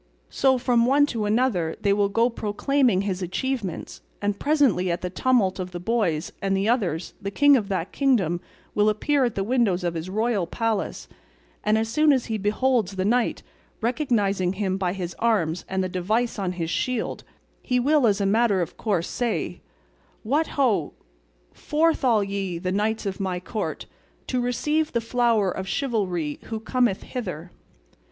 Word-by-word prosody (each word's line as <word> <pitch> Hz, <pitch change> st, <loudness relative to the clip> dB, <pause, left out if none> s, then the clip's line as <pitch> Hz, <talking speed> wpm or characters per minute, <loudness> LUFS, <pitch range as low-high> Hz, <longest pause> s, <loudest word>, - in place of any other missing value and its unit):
So 265 Hz, -1 st, +3 dB
from 240 Hz, -1 st, +2 dB
one 285 Hz, +2 st, +5 dB
to 220 Hz, -3 st, -1 dB
another 210 Hz, -7 st, +1 dB
they 200 Hz, -1 st, +2 dB
will 200 Hz, 0 st, +2 dB
go 230 Hz, +4 st, +3 dB
proclaiming 235 Hz, 0 st, +1 dB
his 195 Hz, -2 st, -2 dB
achievements; 200 Hz, +1 st, -3 dB, 0.2 s
and 205 Hz, 0 st, -1 dB
presently 275 Hz, -, +2 dB
at 170 Hz, -, -1 dB
the 180 Hz, -, -4 dB
tumult 200 Hz, -4 st, +2 dB
of 185 Hz, 0 st, -3 dB
the 175 Hz, -, -4 dB
boys 180 Hz, -6 st, 0 dB
and 195 Hz, 0 st, +1 dB
the 195 Hz, +2 st, 0 dB
others 190 Hz, -9 st, 0 dB
the 200 Hz, -, -3 dB
king 285 Hz, +7 st, +5 dB
of 220 Hz, -6 st, 0 dB
that 185 Hz, -2 st, -2 dB
kingdom 200 Hz, -, +1 dB, 0.3 s
will 210 Hz, +1 st, +3 dB
appear 265 Hz, +6 st, +1 dB
at 240 Hz, -, -2 dB
the 195 Hz, -, 0 dB
windows 210 Hz, -5 st, +1 dB
of 175 Hz, -1 st, -1 dB
his 165 Hz, +2 st, -5 dB
royal 215 Hz, -2 st, 0 dB
palace, 225 Hz, 0 st, -2 dB, 0.6 s
and 210 Hz, +1 st, +3 dB
as 220 Hz, 0 st, 0 dB
soon 305 Hz, +7 st, +3 dB
as 260 Hz, -4 st, +2 dB
he 220 Hz, -1 st, -3 dB
beholds 210 Hz, 0 st, +1 dB
the 190 Hz, 0 st, -1 dB
knight, 240 Hz, +3 st, +1 dB, 0.4 s
recognising 210 Hz, -, 0 dB
him 190 Hz, -1 st, -1 dB
by 185 Hz, -2 st, -1 dB
his 180 Hz, -3 st, -4 dB
arms 180 Hz, -8 st, +1 dB
and 190 Hz, 0 st, 0 dB
the -, -, -1 dB
device 210 Hz, +6 st, -1 dB
on 185 Hz, -2 st, -1 dB
his 170 Hz, -2 st, -3 dB
shield, 250 Hz, +3 st, -2 dB, 0.4 s
he 250 Hz, -1 st, 0 dB
will 285 Hz, 0 st, +3 dB
as 205 Hz, -1 st, +2 dB
a 200 Hz, -, +1 dB
matter 210 Hz, 0 st, +3 dB
of 175 Hz, -, -3 dB
course 190 Hz, -6 st, -1 dB
say, 240 Hz, -2 st, -2 dB, 0.6 s
'What 290 Hz, +8 st, +1 dB
ho! 225 Hz, -, +2 dB, 0.6 s
Forth 315 Hz, 0 st, +1 dB
all 230 Hz, -5 st, +4 dB
ye, 195 Hz, -3 st, -3 dB
the 185 Hz, +2 st, -3 dB
knights 215 Hz, +3 st, 0 dB
of 195 Hz, 0 st, -3 dB
my 185 Hz, -2 st, -2 dB
court, 210 Hz, +4 st, -4 dB, 0.4 s
to 250 Hz, -1 st, -1 dB
receive 300 Hz, +6 st, 0 dB
the 235 Hz, -, +2 dB
flower 230 Hz, -4 st, +1 dB
of 190 Hz, +1 st, -5 dB
chivalry 190 Hz, -, -1 dB
who 225 Hz, -1 st, -4 dB
cometh 235 Hz, -2 st, 0 dB
hither! 180 Hz, -, -6 dB
210 Hz, 175 wpm, -24 LUFS, 185-245 Hz, 0.6 s, one